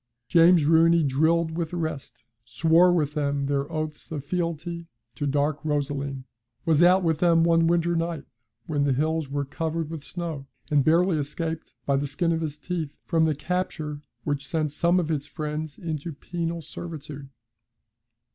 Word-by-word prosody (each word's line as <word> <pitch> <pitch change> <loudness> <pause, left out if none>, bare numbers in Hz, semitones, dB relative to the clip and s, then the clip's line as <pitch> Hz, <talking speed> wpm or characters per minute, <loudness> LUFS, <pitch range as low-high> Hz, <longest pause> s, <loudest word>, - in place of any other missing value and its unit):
James 170 +1 +6
Rooney 165 +1 +5
drilled 160 +4 +2
with 165 -2 -2
the 175 - -5
rest, 155 -8 -5 0.2
swore 165 +9 +4
with 150 -4 +1
them 140 -2 0
their 140 0 -1
oaths 155 +1 -5
of 145 -3 -4
fealty 170 0 -3 0.3
to 145 +4 -3
Dark 145 +1 0
Rosaleen, 140 -2 -2 0.4
was 160 -1 +3
out 180 +2 +6
with 160 -2 +1
them 165 -2 +4
one 165 0 +4
winter 170 0 +2
night 165 -2 -2 0.4
when 145 -2 0
the 140 -1 +2
hills 155 +2 0
were 140 0 -2
covered 160 +2 -3
with 160 -3 -6
snow, 160 -6 -5 0.2
and 145 -2 +4
barely 165 +2 +3
escaped 160 +3 -4
by 140 -1 +2
the 145 +1 -1
skin 165 +5 0
of 165 0 0
his 150 -2 -3
teeth 165 -1 -3 0.2
from 165 -1 +2
the 155 -2 +1
capture 155 -3 -3 0.2
which 145 -2 -2
sent 155 -2 -1
some 170 +4 +2
of 165 -3 -2
his 145 -3 -1
friends 150 +1 -4
into 160 -1 -4
penal 170 +2 -4
servitude. 150 -4 -8
160 Hz, 165 wpm, -26 LUFS, 145-170 Hz, 0.4 s, James